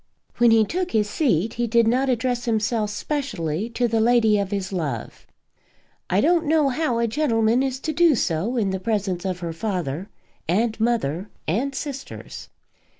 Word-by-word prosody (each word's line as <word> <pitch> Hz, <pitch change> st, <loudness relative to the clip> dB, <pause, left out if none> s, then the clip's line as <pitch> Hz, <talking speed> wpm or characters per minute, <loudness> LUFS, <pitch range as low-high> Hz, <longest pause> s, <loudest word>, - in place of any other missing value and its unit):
When 240 Hz, 0 st, +6 dB
he 225 Hz, -1 st, +5 dB
took 360 Hz, -, -3 dB
his 210 Hz, -1 st, +2 dB
seat 220 Hz, -, +1 dB
he 240 Hz, 0 st, -1 dB
did 230 Hz, 0 st, +3 dB
not 260 Hz, +4 st, +2 dB
address 245 Hz, 0 st, 0 dB
himself 220 Hz, -1 st, 0 dB
specially 210 Hz, -, -3 dB
to 240 Hz, +1 st, 0 dB
the 225 Hz, -1 st, +1 dB
lady 225 Hz, -2 st, +4 dB
of 200 Hz, -1 st, -2 dB
his 195 Hz, -1 st, -3 dB
love. 145 Hz, -, -4 dB, 0.8 s
I 190 Hz, +3 st, +3 dB
don't 330 Hz, +1 st, +2 dB
know 305 Hz, -2 st, +3 dB
how 260 Hz, -3 st, 0 dB
a 235 Hz, -, +2 dB
gentleman 230 Hz, -2 st, +2 dB
is 265 Hz, -1 st, -1 dB
to 315 Hz, -, -2 dB
do 335 Hz, -1 st, +4 dB
so 195 Hz, +5 st, -1 dB
in 200 Hz, -4 st, +1 dB
the 190 Hz, -, -2 dB
presence 195 Hz, -3 st, -2 dB
of 185 Hz, -2 st, -3 dB
her 170 Hz, -1 st, -4 dB
father, 180 Hz, -2 st, -3 dB, 0.4 s
and 220 Hz, +5 st, +1 dB
mother, 210 Hz, -6 st, 0 dB, 0.2 s
and 260 Hz, -, -1 dB
sisters. 275 Hz, -2 st, -7 dB
225 Hz, 170 wpm, -23 LUFS, 195-255 Hz, 0.8 s, When